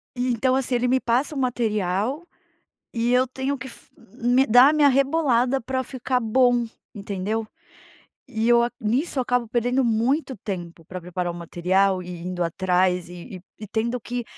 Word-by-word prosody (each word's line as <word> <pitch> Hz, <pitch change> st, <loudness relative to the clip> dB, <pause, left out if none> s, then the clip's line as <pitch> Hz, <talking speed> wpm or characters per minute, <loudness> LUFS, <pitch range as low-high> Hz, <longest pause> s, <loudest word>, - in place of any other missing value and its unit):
e 250 Hz, 0 st, 0 dB
então 255 Hz, +3 st, +1 dB
assim 260 Hz, -1 st, 0 dB
ele 245 Hz, +1 st, +1 dB
me 260 Hz, +1 st, +3 dB
passa 255 Hz, +6 st, 0 dB
o -, -, -4 dB
material, 230 Hz, -, -1 dB, 0.7 s
e 235 Hz, +1 st, 0 dB
eu 255 Hz, +1 st, +4 dB
tenho 265 Hz, +2 st, -3 dB
que 260 Hz, +1 st, -8 dB
fi -, -, -13 dB
me 245 Hz, +6 st, 0 dB
dar 245 Hz, +5 st, +7 dB
a -, -, +1 dB
minha 295 Hz, -2 st, +5 dB
rebolada 270 Hz, -2 st, +2 dB
para 260 Hz, +2 st, -2 dB
ficar 255 Hz, 0 st, -2 dB
bom, 245 Hz, +1 st, +2 dB, 0.3 s
entendeu? 205 Hz, +2 st, -3 dB, 0.8 s
E 225 Hz, -1 st, -1 dB
eu 235 Hz, 0 st, +6 dB, 0.2 s
nisso 260 Hz, +6 st, 0 dB
acabo 245 Hz, -1 st, 0 dB
perdendo 245 Hz, +3 st, 0 dB
muito 255 Hz, +5 st, 0 dB
tempo 175 Hz, -4 st, -6 dB
para 185 Hz, 0 st, -7 dB
preparar 180 Hz, 0 st, -3 dB
o -, -, -11 dB
material 185 Hz, +3 st, +1 dB
e 175 Hz, -1 st, -8 dB
indo 180 Hz, 0 st, -3 dB
atrás 180 Hz, +1 st, 0 dB
e 175 Hz, +2 st, -9 dB
e -, -, -11 dB, 0.2 s
e 215 Hz, -, -7 dB
tendo 235 Hz, +3 st, -2 dB
que 240 Hz, +1 st, -4 dB
235 Hz, 170 wpm, -23 LUFS, 190-260 Hz, 0.8 s, dar